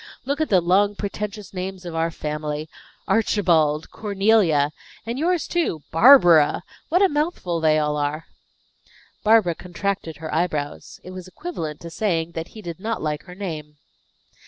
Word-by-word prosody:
Look 280 Hz, +3 st, -1 dB
at 315 Hz, -, 0 dB
the 185 Hz, -3 st, +4 dB
long, 200 Hz, +4 st, +3 dB
pretentious 205 Hz, 0 st, -5 dB
names 185 Hz, 0 st, -5 dB
of 170 Hz, -, -6 dB
our 165 Hz, 0 st, 0 dB
family 150 Hz, -1 st, -4 dB, 0.4 s
Archibald! 165 Hz, -8 st, +2 dB
Cornelia! 195 Hz, -8 st, +2 dB, 0.3 s
And 235 Hz, +3 st, -3 dB
yours, 345 Hz, +1 st, +1 dB
too 320 Hz, -, -1 dB
Barbara! 175 Hz, -, +6 dB, 0.3 s
What 360 Hz, +5 st, +3 dB
a -, -, +7 dB
mouthful 295 Hz, -, -1 dB
they 155 Hz, -1 st, +3 dB
all 150 Hz, -1 st, 0 dB
are!" 150 Hz, +2 st, -2 dB, 1.0 s
Barbara 215 Hz, -5 st, +4 dB
contracted 180 Hz, -1 st, -4 dB
her 160 Hz, -1 st, -6 dB
eyebrows. 155 Hz, -3 st, -2 dB
It 185 Hz, -, -9 dB
was 185 Hz, -1 st, -8 dB
equivalent 170 Hz, -, -6 dB
to 170 Hz, -, -8 dB
saying 170 Hz, -2 st, -1 dB
that 165 Hz, 0 st, -5 dB
he 215 Hz, -, -9 dB
did 170 Hz, -1 st, -7 dB
not 225 Hz, +3 st, -2 dB
like 150 Hz, -1 st, -3 dB
her 180 Hz, -1 st, -11 dB
name. 155 Hz, -6 st, -6 dB
180 Hz, 155 wpm, -23 LUFS, 155-210 Hz, 1.0 s, a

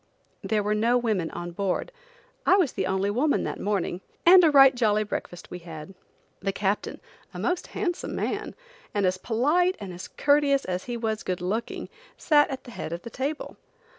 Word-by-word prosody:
There 215 Hz, -2 st, 0 dB
were 210 Hz, +1 st, +1 dB
no 230 Hz, +3 st, +3 dB
women 215 Hz, -9 st, 0 dB
on 175 Hz, 0 st, -6 dB
board. 195 Hz, -, -2 dB, 0.5 s
I -, -, +5 dB
was 350 Hz, -9 st, +2 dB
the 190 Hz, -2 st, -2 dB
only 190 Hz, +1 st, 0 dB
woman 280 Hz, +8 st, +1 dB
that -, -, -4 dB
morning, 195 Hz, -3 st, -1 dB, 0.2 s
and 360 Hz, +1 st, +9 dB
a 325 Hz, -, +6 dB
right 270 Hz, -2 st, +8 dB
jolly 215 Hz, -4 st, +2 dB
breakfast 175 Hz, -4 st, -6 dB
we 180 Hz, -, -6 dB
had. 165 Hz, +1 st, -9 dB, 0.5 s
The 195 Hz, +1 st, -1 dB
captain, 200 Hz, +1 st, -2 dB, 0.4 s
a -, -, -5 dB
most 355 Hz, 0 st, -1 dB
handsome 350 Hz, -3 st, -3 dB
man, -, -, -3 dB, 0.4 s
and 205 Hz, -1 st, +2 dB
as 185 Hz, 0 st, +1 dB
polite 300 Hz, -, +2 dB
and 195 Hz, -3 st, -7 dB, 0.2 s
courteous 285 Hz, -1 st, +3 dB
as 185 Hz, 0 st, -3 dB
he 240 Hz, -1 st, -4 dB
was 220 Hz, -2 st, -2 dB
good 180 Hz, -1 st, -3 dB
looking, 200 Hz, +6 st, -3 dB, 0.3 s
sat 295 Hz, -2 st, +4 dB
at 265 Hz, -2 st, -5 dB
the 245 Hz, -, -11 dB
head 165 Hz, -, -6 dB
of 170 Hz, +1 st, -6 dB
the 235 Hz, -, -8 dB
table. 285 Hz, +4 st, -4 dB
220 Hz, 185 wpm, -26 LUFS, 190-280 Hz, 0.5 s, and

